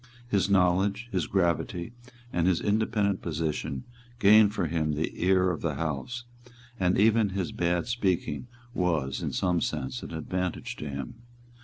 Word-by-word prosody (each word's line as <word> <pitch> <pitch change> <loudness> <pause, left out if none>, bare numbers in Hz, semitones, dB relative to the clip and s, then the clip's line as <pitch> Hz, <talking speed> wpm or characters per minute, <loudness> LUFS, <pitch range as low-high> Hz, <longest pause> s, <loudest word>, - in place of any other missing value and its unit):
His 100 -4 +1
knowledge, 100 +4 +2
his 90 -5 0
gravity 85 +1 0 0.4
and 85 0 +2
his 90 -3 +3
independent 105 -2 +1
position 75 -4 -2 0.3
gained 105 -1 +6
for 100 -4 -1
him 80 -1 0
the 75 +2 -1
ear 95 0 +4
of 80 - -4
the 80 -4 -1
House; 80 - -3 0.6
and 90 -1 +2
even 110 0 +4
his 95 -4 -2
bad 85 0 0
speaking 115 -1 -1 0.3
was, 80 - 0
in - - -2
some 90 -3 +1
sense, 65 -1 -2
an - - -8
advantage 90 +2 -3
to 75 - -5
him. 70 - -6
90 Hz, 150 wpm, -28 LUFS, 80-100 Hz, 0.6 s, gained